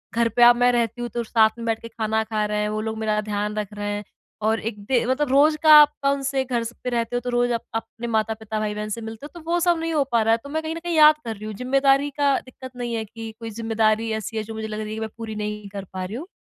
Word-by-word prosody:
घर 230 0 +2
पे 240 +2 +3
अब 240 0 +8
मैं 245 0 +4
रहती 240 0 -1
हूँ, 240 - -3
तो 235 +2 -3
साथ 220 -1 +4
में 230 - -6
बैठ 225 -1 0
के 230 - -8
खाना 220 -1 -1
खा 215 -1 -1
रहे 210 0 -1
हैं, 210 - -1
वो 215 0 -2
लोग 220 0 -4
मेरा 215 -1 0
ध्यान 210 0 -3
रख 210 -1 -3
रहे 205 0 -3
हैं 205 0 -4 0.4
और 220 +1 +2
एक 215 -1 -5
दे 245 -1 +2
मतलब 260 +4 +1
रोज़ 300 +3 +5
का 310 -1 +8
आपका 290 -1 +2
उन 280 0 -1
से 270 -1 0
घर 240 -2 -1
स 235 +1 -6
पे 250 - -1
रहते 235 0 -1
हो, - - +2
तो 245 +1 -5
रोज़ 245 0 +1
आप 230 - -1
अपने 230 +1 -5
माता-पिता, 220 -1 -1
भाई-बहन 210 0 -3
से 230 +2 -4
मिलते 225 +5 -8
हो, 345 +3 -11
तो 325 +1 -11
वो 350 - +3
सब 345 -1 +3
नहीं 330 0 -2
हो 290 -2 +3
पा 230 -1 +3
रहा 225 +1 +2
है, - - +3
तो 280 - -9
मैं 315 +2 -2
कहीं 320 +1 -3
न - - -5
कहीं 345 -1 -2
याद 305 0 +8
कर 225 -1 -3
रही 210 +2 -9
हूँ। 215 - -5
ज़िम्मेदारी 275 +3 +2
का 280 -1 +3
दिक्कत 255 0 -11
नहीं 240 -1 -4
है 225 - -2
कि 225 +1 -8
कोई 225 -1 -6
ज़िम्मेदारी 225 0 0
ऐसी 225 +1 -6
है, 215 - -1
जो 225 - -8
मुझे 220 0 -4
लग 215 0 -5
रही 215 0 -4
है 215 - -4
कि - - -5
मैं 220 0 -3
पूरी 220 -1 -6
नहीं 210 -1 -4
कर 200 -1 -6
पा 185 -1 -3
रही 205 +5 -6
हूँ। 335 +6 -7
230 Hz, 310 wpm, -23 LUFS, 215-260 Hz, 0.4 s, अब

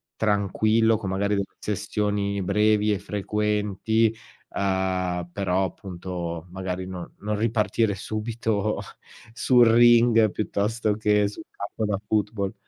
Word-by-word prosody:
tranquillo, 110 +2 +2
con 100 -3 -5
magari 100 +2 0
de 100 - 0
sessioni 105 -1 -2
brevi 105 +2 +2
e 100 - -2
frequenti, 105 +2 0 0.3
uhm, 95 -2 -1
però 95 -1 0
appunto 90 -2 -6
magari 95 0 -4
no 90 -2 -8
non 105 +1 -2
ripartire 110 -1 +1
subito 110 0 -2 0.5
sul 125 -1 +4
ring 115 -1 +6
piuttosto 105 +2 -1
che 105 -1 +2
sul 105 +11 -8
campo 105 +2 -5
da 105 -1 0
football. 105 -2 -1
105 Hz, 115 wpm, -25 LUFS, 95-110 Hz, 0.5 s, ring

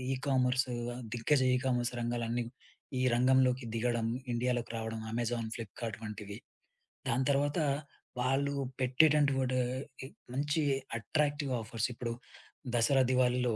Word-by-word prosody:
Ecommerce 130 -2 +1 0.4
దిగ్గజ 130 +4 +2
'ecommerce' 125 -1 +1
రంగాలన్నీ, 120 0 -1 0.5
ఈ - - +1
రంగంలోకి 130 0 +4
దిగడం, 115 -1 0 0.2
ఇండియాలోకి 120 -1 0
రావడం 110 0 -3
'అమెజాన్,'' 115 -1 -1
ఫ్లిప్‌కార్ట్' 115 -1 -6
వంటివి. 105 -1 -6 0.7
దాని 125 +3 +1
తర్వాత 145 +3 +1 0.6
వాళ్ళు 135 +3 +1 0.3
పెట్టేటంటివాటా 135 -1 +3 0.4
ఈ - - -5 0.3
మంచి 145 +4 +1 0.4
అట్రాక్టివ్ 145 +5 0
ఆఫర్స్. 110 +1 -2
ఇప్పుడు 115 0 -3 0.6
దసరా, 130 +3 +4
దివాళీలో 125 -2 +2
125 Hz, 100 wpm, -32 LUFS, 115-135 Hz, 0.7 s, రంగంలోకి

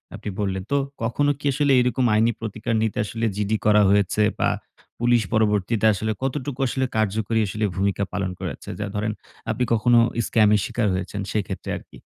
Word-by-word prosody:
আপনি - - -6
বললেন, 95 -2 -1
তো 140 - +3 0.3
কখনো 145 +6 +1
কি - - -10
আসলে 145 +1 +2
এরকম 125 +1 +1
আইনি 115 +2 +4
প্রতিকার 110 +1 -3
নিতে 110 - -2
আসলে 115 +3 -3
GD 105 0 -2
করা 105 0 +6
হয়েছে? 100 +1 +2 0.2
বা - - +3 0.5
পুলিশ 120 0 +3
পরবর্তীতে 110 0 +1
আসলে 110 +2 -2
কতটুকু 135 0 -3
আসলে 130 +2 0
কার্যকরী 110 +1 0
আসলে 105 +3 -1
ভূমিকা 100 +1 0
পালন 100 -2 -1
করেছে? - - -6
যা 105 - -2
ধরেন 105 +1 -1 0.4
আপনি 125 - 0
কখনো 120 +1 +4 0.3
স্ক্যামের 105 -2 +4
শিকার 115 -3 -1
হয়েছেন 95 +2 -3
সেক্ষেত্রে 95 -4 -3
আরকি। - - -14
110 Hz, 170 wpm, -23 LUFS, 100-120 Hz, 0.5 s, করা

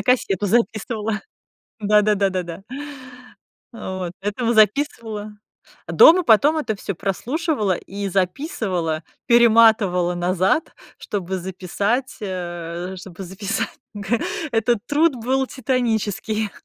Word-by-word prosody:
на - - -3
кассету 210 -6 +1
записывала. 220 0 0 0.6
Да, 210 0 +4
да-да-да, 195 -3 +1
да. 170 +2 -8 1.1
Вот, 185 -5 -5
этого 230 +4 -1
записывала 215 -2 +1 0.5
А - - -6
дома 360 +3 +8
потом 280 +8 +5
это 220 -8 -2
всё 200 -1 -4
прослушивала 215 - -1
и 200 +2 -5
записывала, 185 - -1 0.2
перематывала 220 -7 +5
назад, 185 - 0 0.2
чтобы 190 -2 -3
записать, 195 +7 -2
э, 175 -2 -5
чтобы 190 +1 -9
записать. 195 +4 -3 0.2
Г 205 +3 -1 0.3
этот 230 +1 +2
труд 295 -1 +2
был 260 +3 0
титанический. 220 -4 -1
210 Hz, 105 wpm, -21 LUFS, 185-235 Hz, 1.1 s, дома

